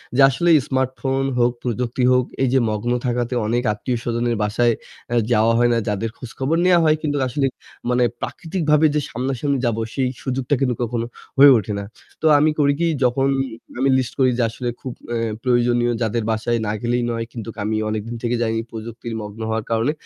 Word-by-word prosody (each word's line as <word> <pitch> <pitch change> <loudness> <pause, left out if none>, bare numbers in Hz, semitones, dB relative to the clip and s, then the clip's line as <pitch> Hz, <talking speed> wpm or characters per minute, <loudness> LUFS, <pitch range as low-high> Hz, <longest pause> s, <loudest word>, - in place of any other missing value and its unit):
যে 140 - +4
আসলে 170 +6 +1 0.2
স্মার্টফোন 130 0 -1 0.2
হোক 120 0 +4
প্রযুক্তি 125 +1 -1
হোক 125 -1 +3 0.2
এই 130 - +2
যে 135 - +5
মগ্ন 110 +3 -2
থাকাতে 120 0 -1
অনেক 120 +2 0
আত্মীয়স্বজনের 120 +1 -2
বাসায় 115 +3 +2 0.4
আ - - +2 0.2
যাওয়া 110 +1 +4
হয় 120 0 +4
না - - +2
যাদের 105 +2 -1
খোঁজখবর 135 +5 -2
নেওয়া 180 -1 +5
হয় 155 0 +5
কিন্তু 145 -1 -1
আসলে 135 +3 0 0.4
মানে 125 0 +3 0.2
প্রাকৃতিকভাবে 160 -3 0
যে - - +3
সামনাসামনি 135 +3 -1
যাব 115 -2 0 0.2
সেই 130 -2 0
সুযোগটা 130 +1 0
কিন্তু 125 -3 +1
কখনো 115 0 -2 0.3
হয়ে 140 +1 +9
ওঠে 105 -1 -3
না। - - -4 0.4
তো - - -2
আমি 155 +2 +4
করি 140 -1 +4
কি 170 - +2 0.2
যখন 130 +2 +2 0.5
আমি 135 +1 +3
লিস্ট 125 -2 -2
করি 130 -1 +5
যে 125 - +2
আসলে 120 +2 -4
খুব 130 - -5 0.2
এ - - 0 0.3
প্রয়োজনীয় 120 -1 +2
যাদের 115 0 0
বাসায় 110 +2 0
না - - 0
গেলেই 120 +1 0
নয় 115 0 -2
কিন্তু 115 -2 -7 0.2
আমি 110 +1 0
অনেকদিন 110 +2 -4
থেকে 120 0 0
যাইনি 115 -1 0
প্রযুক্তির 115 +1 -7
মগ্ন 105 +1 -8
হওয়ার 110 -1 -2
কারণে। 115 +5 +2
120 Hz, 185 wpm, -21 LUFS, 115-135 Hz, 0.5 s, হয়ে